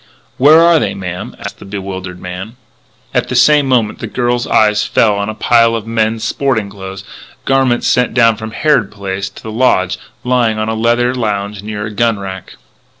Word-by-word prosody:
"Where 150 +5 +7
are 170 -1 +5
they, - - -2
ma'am?" 90 -1 -6
asked - - -8
the - - -11
bewildered 95 -2 -6
man. 90 +6 -7 0.6
At - - 0
the 125 - -2
same 145 +3 +4
moment 120 -5 +1
the - - -5
girl's 120 -1 -1
eyes 105 -1 +3
fell 105 -1 +2
on 100 +1 -2
a 110 - -5
pile 115 0 +3
of 110 -2 -4
men's 110 0 -1
sporting 110 -4 -1
clothing 95 -1 -8 0.4
garments 135 -3 +2
sent 125 -1 +1
down 115 -2 +4
from 110 +1 -7
Harrod 125 -2 +1
Place 100 -1 -4
to 95 - -15
the 110 - -6
Lodge 100 -6 +1 0.2
lying 125 -3 +1
on 110 0 -2
a - - -1
leather 120 +2 +1
lounge 105 -4 -3
near 105 0 -5
a 105 - -6
gun 115 +1 +1
rack. 95 -1 -8
110 Hz, 190 wpm, -15 LUFS, 100-120 Hz, 0.6 s, Where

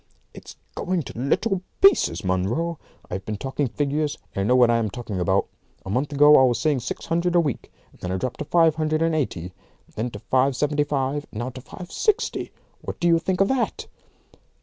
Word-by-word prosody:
"It's - - -11 0.2
going 180 -2 -1
to - - -9
little 180 - 0 0.2
pieces, 390 0 +4
Munro. 115 - -1 0.3
I've 95 +2 -4
been 105 +1 -4
taking 135 +4 -2
figures, 145 +3 -1 0.2
and 100 - -2
I 100 - 0
know 125 - +4
what 120 -2 +5
I 115 - +3
am 110 -2 0
talking 105 -3 -5
about. 95 +2 +2 0.4
A 95 - -5
month 135 +7 0
ago 145 +1 +7
I 130 - +6
was 125 -2 +2
seeing 150 -4 +1
six 120 - -5
hundred 170 +1 0
a - - +6
week. 145 -8 -2 0.3
Then 90 - -4
I 95 - 0
dropped 125 +5 -4
to 150 - -3
five 165 +1 +4
hundred 155 0 +1
and 165 0 +1
eighty; 90 - -2 0.4
then 115 +3 -2
to 105 - -8
five 130 +5 +1
seventy 145 +1 +1
five; 145 0 -2
and - - -9
now 120 +3 -3
to 130 0 -10
five 180 +7 -10
sixty. 430 -2 0 0.3
What - - -6
do 175 - +1
you 165 -1 +5
think 185 +2 -1
of 195 - +4
that?" 265 -3 -1
140 Hz, 215 wpm, -24 LUFS, 120-165 Hz, 0.4 s, ago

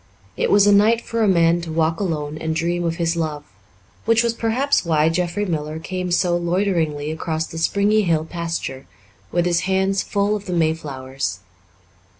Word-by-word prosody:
It - - 0
was 205 0 +5
a 205 - +5
night 215 +3 +4
for 230 0 -3
a 215 - +3
man 170 -2 +3
to 165 -1 -6
walk 160 0 0
alone 155 -6 -2
and 160 0 -2
dream 175 +2 -1
of 165 -1 -1
his 170 0 0
love, 155 -3 -3 0.6
which 230 +1 +4
was 235 -1 +1
perhaps 240 +5 +1
why 160 -2 +2
Jeffrey 180 +4 -1
Miller 155 -3 -3
came 180 +2 -4
so 175 0 +2
loiteringly 170 -4 0
across 160 0 -2
the 165 - -7
springy 205 +5 +2
hill 165 -5 +1
pasture, 165 - -5 0.4
with 175 0 +1
his 175 -1 +2
hands 190 +1 +1
full 205 +1 0
of 205 -1 -7
the 180 - -2
mayflowers. 135 - -2
170 Hz, 175 wpm, -21 LUFS, 160-200 Hz, 0.6 s, was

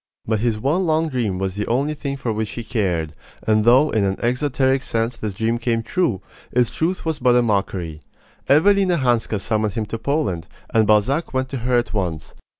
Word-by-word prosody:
But 110 -1 0
his 115 -1 0
one 160 - +1
long 160 0 +1
dream 115 -9 -1
was 95 0 -2
the 105 +2 -3
only 140 +6 0
thing 140 -2 -4
for 120 -4 -2
which 110 0 -2
he 120 - -6
cared; 90 - -1 0.3
and 110 -1 +3
though 130 +6 +5
in 110 - +1
an 95 -1 0
exoteric 130 +2 +1
sense 115 -1 -1
this 105 -4 -5
dream 115 +3 0
came 115 -1 0
true, 150 - -1 0.3
its 120 -2 +2
truth 175 +3 -2
was 160 -2 -1
but 125 -1 +4
a 125 - +4
mockery. 95 -7 -1 0.5
Evelina 185 +4 +4
Hanska 120 -5 +1
summoned 110 -1 -1
him 110 - -1
to 110 +2 -5
Poland, 115 - -1 0.3
and 110 -2 +4
Balzac 130 +9 +2
went 130 0 0
to 135 - -4
her 125 +1 +1
at 120 -2 -1
once. 90 -7 -3
120 Hz, 200 wpm, -21 LUFS, 105-135 Hz, 0.5 s, though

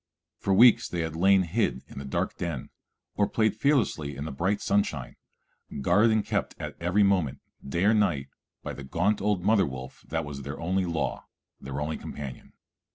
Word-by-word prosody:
For 100 - -1
weeks 115 +4 +6
they 85 - -2
had 80 -1 -3
lain 95 +3 +5
hid 85 - -1
in - - -9
the 70 - -7
dark 65 - -2
den, 85 -7 -4 0.4
or 100 - +1
played 110 -2 +1
fearlessly 110 - +1
in 70 +2 -5
the 80 - -4
bright 95 +9 0
sunshine, 90 -10 -1 0.7
guarded 100 +10 +4
and 110 -1 +2
kept - - -2
at - - -5
every 90 +5 +3
moment, 95 -9 +2 0.2
day 85 +6 -2
or 105 +2 +5
night, 85 -11 +1 0.3
by - - -4
the 70 - -8
gaunt 90 +10 0
old 100 -3 0
mother 100 -2 +4
wolf 65 -1 -8
that 80 -1 -2
was 70 -1 -6
their 70 +1 -6
only 95 +3 0
law, 85 -2 -2 0.3
their 70 +1 -5
only 75 +2 -2
companion. 70 -4 -8
85 Hz, 185 wpm, -27 LUFS, 70-100 Hz, 0.7 s, weeks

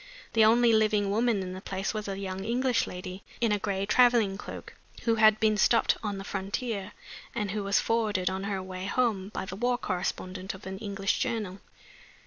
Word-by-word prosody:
The 225 - +5
only 230 +1 +5
living 215 -2 +3
woman 220 -2 +2
in 185 0 -5
the 185 - -7
place 195 +1 -3
was 215 -1 -4
a 195 -1 -3
young 190 -1 -4
English 245 +3 +1
lady, 180 +1 -7 0.2
in 230 -2 +2
a 205 - +2
gray 195 -1 -1
traveling 235 -3 +4
cloak, 200 - -8 0.3
who 230 - +3
had 215 0 +6
been 215 -1 +3
stopped 230 +3 +4
on 205 -2 -3
the 195 - -6
frontier, 200 +1 -3 0.4
and 210 -4 -1
who 210 0 -2
was 200 0 +2
forwarded 215 -5 0
on 190 +2 -1
her 195 -2 -2
way 185 0 -6
home 205 -4 0
by 210 - -4
the 190 - -6
war 245 +4 +1
correspondent 185 -1 -3
of 190 - -13
an 190 0 -6
English 200 -1 -1
journal. 205 -4 -2
200 Hz, 195 wpm, -28 LUFS, 190-225 Hz, 0.4 s, had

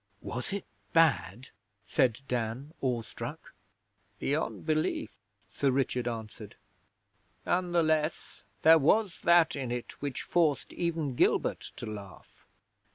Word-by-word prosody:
'Was 125 +6 -5
it 200 -1 -3 0.3
bad?' 130 - +2 0.4
said 120 -1 +2
Dan, 125 +5 -3
awestruck. 120 -5 -4 0.6
'Beyond 150 +3 -2
belief,' 155 -1 0 0.4
Sir 140 - +1
Richard 125 -2 0
answered. 110 -3 -6 0.9
'None 180 0 +1
the 170 -1 +3
less, 155 0 -1 0.2
there 160 +1 +8
was 190 +5 +2
that 170 -1 +5
in 130 -4 -3
it 120 -1 -5
which 140 -3 -3
forced 160 -5 +1
even 165 -5 -1
Gilbert - - +1
to - - -7
laugh. 100 -3 -10
140 Hz, 115 wpm, -30 LUFS, 120-165 Hz, 0.9 s, there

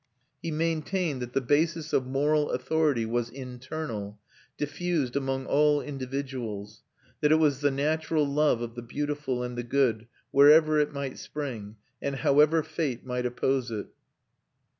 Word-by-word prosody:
He 165 - -3
maintained 160 -1 -1
that 125 0 -6
the 135 - +1
basis 155 +4 +1
of 130 - +2
moral 145 +3 +1
authority 140 -2 +1
was 120 +1 -1
internal, 125 -5 -6 0.4
diffused 150 -3 -1
among 135 -1 -1
all 150 +1 +3
individuals; 130 -7 -5 0.4
that 150 - +3
it - - +7
was 150 -4 +3
the 145 - +4
natural 155 +2 0
love 140 -4 +2
of 115 -1 -6
the 120 - -7
beautiful 145 0 -3
and 125 0 -4
the 120 - -2
good 120 -3 +1 0.2
wherever 155 +2 +6
it 150 0 +1
might 140 -2 -5
spring, 115 -8 -6 0.3
and 140 0 -2
however 150 +4 +4
fate 150 -6 -3
might 125 -1 -1
oppose 130 +1 0
it. 105 -3 -5
140 Hz, 145 wpm, -28 LUFS, 125-150 Hz, 0.4 s, it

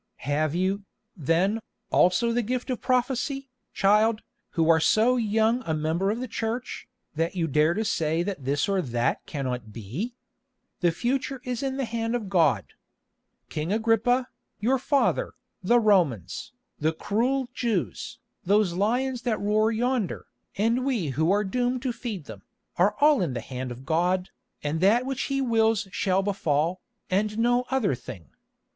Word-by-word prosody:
"Have 150 +2 0
you, 190 +3 0 0.3
then, 180 +7 +1 0.3
also 205 +7 +4
the 240 +1 +1
gift 250 +3 -2
of 250 - -3
prophecy, 260 +1 0 0.2
child, 215 +3 +3 0.3
who 165 -1 +2
are 165 -1 +6
so 225 +9 +4
young 225 +1 +2
a 160 -7 -1
member 160 +5 0
of 220 +3 -1
the 255 - -4
Church, 230 +2 -4 0.3
that 165 +3 -1
you 170 -3 0
dare 155 +3 +2
to 220 +2 -1
say 165 -4 0
that 185 -7 -4
this 140 +2 0
or 195 -2 +1
that 120 -5 -1
cannot 125 -6 -4
be? 125 - -5 0.6
The 175 - +3
future 260 +8 -2
is 250 -1 -3
in 270 -1 -2
the 270 - 0
hand 230 +1 -2
of 220 -5 -3
God. 160 - +2 0.7
King 155 +4 -3
Agrippa, 230 +3 +2 0.3
your 250 +5 +2
father, 290 - +1 0.3
the 235 +6 +4
Romans, 180 - +1 0.3
the 160 +2 +1
cruel 245 +9 0
Jews, 185 - -2 0.3
those 200 -1 +3
lions 245 +7 0
that 235 -3 -1
roar 215 +2 +2
yonder, 240 -2 -1 0.3
and 230 +5 +2
we 235 - 0
who 155 +5 +1
are 205 +2 +3
doomed 245 +5 -1
to 255 -3 -1
feed 215 - -6
them, - - -10 0.3
are 200 +4 +3
all 295 -4 +5
in 165 -8 -1
the - - -1
hand 130 +1 -5
of 125 +2 -9
God, 180 +4 +1 0.3
and 150 +2 -1
that 225 +6 +4
which 270 -1 -2
He 275 0 0
wills 225 -4 +2
shall 190 0 +1
befall, 175 -3 0 0.3
and 210 +3 +1
no 245 +2 +2
other 260 - +1
thing. 110 - -9
205 Hz, 160 wpm, -26 LUFS, 165-240 Hz, 0.7 s, are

